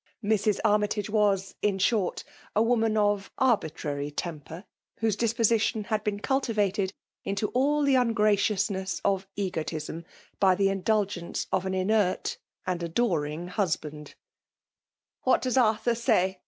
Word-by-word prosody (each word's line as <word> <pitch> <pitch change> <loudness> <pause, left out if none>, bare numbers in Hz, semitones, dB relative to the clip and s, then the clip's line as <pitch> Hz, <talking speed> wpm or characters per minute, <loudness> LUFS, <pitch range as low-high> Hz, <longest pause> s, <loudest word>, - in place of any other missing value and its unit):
Mrs. 210 -1 +2
Armytage 210 0 +1
was, 200 -3 +1
in 205 -2 +1
short, 195 -1 +1 0.3
a 215 - +4
woman 225 -2 +2
of 205 -1 +1
arbitrary 155 - 0
temper; 160 +3 -6 0.3
whose 220 -3 +1
dispo 230 +1 +1
sition 220 -1 0
had 215 0 -1
been 205 -1 -2
cultivated 210 -7 0 0.3
into 200 +2 -2
aU 290 +4 +2
the 275 -1 +4
un 245 -2 +2
graciousness 205 -2 +1
of 195 -1 +1
egotism 165 -4 -3 0.4
by 190 -2 +5
the 195 +1 +2
indulgence 195 -2 -1
of 190 - 0
an 190 - -1
inert 190 0 +1 0.3
and 180 -1 -2
adoring 170 -3 -1
husband, 155 -6 -3 1.1
What 260 - +2
does 255 -2 0
Arthur 225 -1 +3
say 190 -5 +1
205 Hz, 130 wpm, -27 LUFS, 185-220 Hz, 1.1 s, by